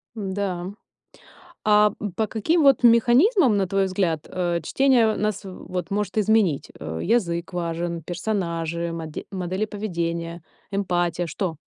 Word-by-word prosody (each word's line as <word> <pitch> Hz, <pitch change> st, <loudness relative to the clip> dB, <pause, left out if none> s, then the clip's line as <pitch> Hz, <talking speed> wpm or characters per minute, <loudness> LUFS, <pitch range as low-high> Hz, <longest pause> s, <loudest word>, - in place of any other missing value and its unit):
Да. 190 Hz, -3 st, -3 dB, 1.0 s
А, 210 Hz, -1 st, +5 dB
м, 205 Hz, -3 st, -4 dB
по 220 Hz, +5 st, -1 dB
каким 310 Hz, +11 st, +1 dB
вот 275 Hz, -3 st, +5 dB
механизмам, 245 Hz, -, +5 dB
на 195 Hz, -1 st, +1 dB
твой 195 Hz, +1 st, +1 dB
взгляд, 180 Hz, -5 st, -1 dB
э, 175 Hz, -2 st, -1 dB
чтение 240 Hz, -, +3 dB
нас 210 Hz, -1 st, -1 dB
вот 185 Hz, -1 st, -6 dB
может 205 Hz, 0 st, -1 dB
изменить? 210 Hz, -8 st, +2 dB
Э, 80 Hz, +1 st, -5 dB
язык 170 Hz, -7 st, 0 dB
важен, 170 Hz, -1 st, -3 dB
персонажи, 170 Hz, -2 st, -2 dB
моде 160 Hz, -2 st, -6 dB
модели 185 Hz, +1 st, -2 dB
поведения, 170 Hz, -5 st, -4 dB, 0.3 s
эмпатия, 175 Hz, -3 st, 0 dB
что? 165 Hz, +1 st, -3 dB
190 Hz, 130 wpm, -24 LUFS, 170-215 Hz, 1.0 s, А